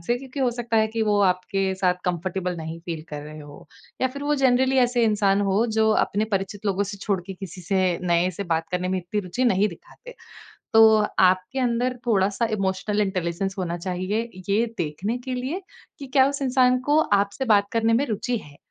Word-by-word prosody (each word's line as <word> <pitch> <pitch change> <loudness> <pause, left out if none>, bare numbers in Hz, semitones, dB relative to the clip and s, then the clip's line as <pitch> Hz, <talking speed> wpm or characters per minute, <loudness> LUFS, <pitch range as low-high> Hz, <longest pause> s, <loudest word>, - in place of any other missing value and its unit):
से। 240 +9 0
क्योंकि 270 +2 -7
हो 255 -2 +2
सकता 235 -1 -2
है 220 0 +4
कि 225 0 -2
वो 210 -1 +2
आपके 190 +1 0
साथ 185 -1 +1
कम्फ़र्टेबल 180 0 -2
नहीं 160 +1 -6
फ़ील 165 -2 -6
कर 145 -1 -6
रहे 155 +1 -10
हों, 145 -1 -12 0.4
या 260 - +4
फिर 280 +2 -8
वो 295 +1 +1
जनरली 260 +1 +3
ऐसे 245 -1 +3
इंसान 205 -2 +2
हों, 200 +3 +2
जो 220 -1 +2
अपने 210 +2 -1
परिचित 195 +2 -3
लोगों 200 0 +1
से - - -6
छोड़ 195 -2 -1
के 195 - -6
किसी 185 -1 -9
से 185 -1 +1
नए 175 +1 +2
से 200 - -2
बात 160 0 -2
करने 180 0 -1
में 190 - 0
इतनी 180 +4 -3
रुचि 195 +7 -2
नहीं 205 -3 +3
दिखाते। - - -13 0.6
तो 220 -1 +7 0.2
आपके 185 +6 +3
अंदर 245 +1 0
थोड़ा-सा 200 +1 +2
इमोशनल 195 +2 -1
इंटेलिजेंस 190 0 -2
होना 175 -2 -2
चाहिए, 185 +6 -2 0.2
ये 220 +4 +2
देखने 180 +9 -2
के 255 +1 -5
लिए 265 +10 -3 0.4
कि 280 - -7
क्या 265 0 +4
उस 280 0 -4
इंसान 255 -1 +3
को 300 - +5 0.2
आपसे 200 +7 -5
बात 200 0 +2
करने 230 0 +2
में 255 +5 +2
रुचि 240 +1 -2
है। 145 -1 -15
200 Hz, 200 wpm, -24 LUFS, 185-240 Hz, 0.6 s, तो